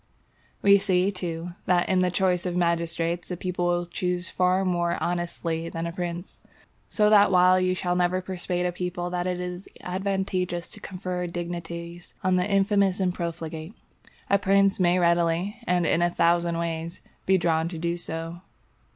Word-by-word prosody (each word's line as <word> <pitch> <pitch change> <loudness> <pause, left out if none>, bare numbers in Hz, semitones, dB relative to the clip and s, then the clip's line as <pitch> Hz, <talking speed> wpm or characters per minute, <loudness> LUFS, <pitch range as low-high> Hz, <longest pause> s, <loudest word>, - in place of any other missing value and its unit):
We 200 0 +7
see, 185 0 +2
too, 175 -2 -4 0.2
that 180 -1 +3
in 185 - +2
the 180 0 +3
choice 180 0 +1
of 180 0 -2
magistrates 170 0 0
a 180 - -3
people 180 0 -2
will 175 0 +1
choose 180 +1 -2
far 185 +1 +2
more 175 -1 0
honestly 170 -1 -2
than 165 0 -4
a 170 - -3
prince; 175 +1 -5 0.5
so 210 -1 +3
that 205 -2 +6
while 185 0 +5
you 185 0 +1
shall 180 -1 -1
never 180 +1 +2
persuade 180 -1 -3
a 180 - +1
people 180 0 -4
that 180 0 -1
it 180 -1 -2
is 180 +1 -6
advantageous 185 -2 -2
to - - -11
confer 180 -2 -4
dignities 170 0 -6
on 185 0 +3
the 180 +2 +1
infamous 200 -1 +2
and 185 -2 +1
profligate, 165 +1 -5 0.5
a 200 - +3
prince 195 0 +3
may 180 0 +3
readily, 170 +2 +1
and 180 -1 +2
in 165 - +2
a 175 - +3
thousand 170 0 +2
ways, 165 0 -3 0.3
be 190 0 +5
drawn 165 -2 +1
to 170 - -6
do 170 +1 -1
so. 165 0 -5
180 Hz, 170 wpm, -26 LUFS, 170-185 Hz, 0.5 s, We